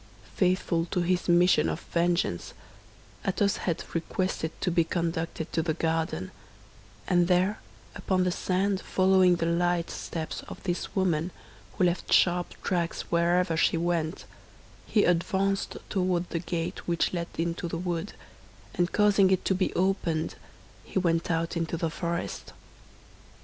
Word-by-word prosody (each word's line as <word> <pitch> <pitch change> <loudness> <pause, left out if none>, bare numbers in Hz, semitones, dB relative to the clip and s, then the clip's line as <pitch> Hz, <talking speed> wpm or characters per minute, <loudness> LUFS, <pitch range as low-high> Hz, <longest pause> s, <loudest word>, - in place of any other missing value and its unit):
Faithful 180 -3 +1
to 180 +1 -1
his 180 +1 0
mission 175 - +5
of 80 - -2
vengeance, 170 - 0 0.7
Athos 200 +1 +1
had 170 -4 -2
requested 170 0 -1
to 180 - 0
be 170 0 +3
conducted 165 -1 -3
to 165 - +2
the 160 -1 -1
garden; 160 - -1 0.8
and 175 -1 +3
there 185 +4 +2 0.3
upon 185 -1 0
the 180 - +1
sand 190 +2 0
following 185 -1 +4
the 165 - -1
light 170 0 +1
steps 160 -1 -5
of - - -8
this 175 -2 -3
woman, 175 -4 +1 0.5
who - - +2
left 175 0 0
sharp 175 -1 +3
tracks 175 -3 -1
wherever 170 0 +2
she 165 - +3
went, 170 0 -1 0.6
he 210 - +3
advanced 190 +3 +1
toward 180 -2 0
the 170 - -1
gate 170 -1 -4
which 170 +1 +1
led 170 -1 -2
into 170 +1 -2
the 165 - -3
wood, 170 -1 -3 0.6
and 175 0 0
causing 205 -2 +4
it 190 -1 +1
to - - +3
be 190 0 0
opened, 175 -4 0 0.5
he - - -5
went 170 -2 +1
out 165 0 0
into 165 0 -1
the 165 -1 -1
forest. 170 +1 -4
175 Hz, 145 wpm, -28 LUFS, 165-185 Hz, 0.8 s, mission